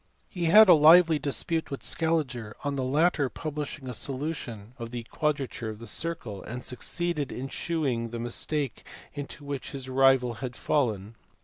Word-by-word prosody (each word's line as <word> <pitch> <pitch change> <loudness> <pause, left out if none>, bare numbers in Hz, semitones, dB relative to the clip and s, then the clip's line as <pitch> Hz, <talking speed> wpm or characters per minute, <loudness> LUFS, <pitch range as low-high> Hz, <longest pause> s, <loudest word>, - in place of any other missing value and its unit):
He 175 -4 -3
had 210 +6 +8
a 180 - +9
lively 160 +1 +7
dispute 160 +3 -2
with 140 - -6
Scaliger, 140 -10 0
on 145 -1 -1
the 135 - -1
latter 145 +1 +2
publishing 150 -2 -5
a 125 - -4
solution 130 -5 -4
of 115 -1 -5
the 120 0 -5
quadrature 140 -3 -2
of 110 - -6
the 115 - -10
circle, 120 - -4
and 125 +3 -7
succeeded 155 +3 -2
in 135 +2 -5
shewing 135 -10 -2
the 120 - -5
mistake 125 +3 -3 0.3
into 145 0 -7
which 140 -2 -5
his 135 -2 -6
rival 130 -2 +4
had 125 -2 -4
fallen. 110 -7 0
140 Hz, 165 wpm, -28 LUFS, 120-155 Hz, 0.3 s, a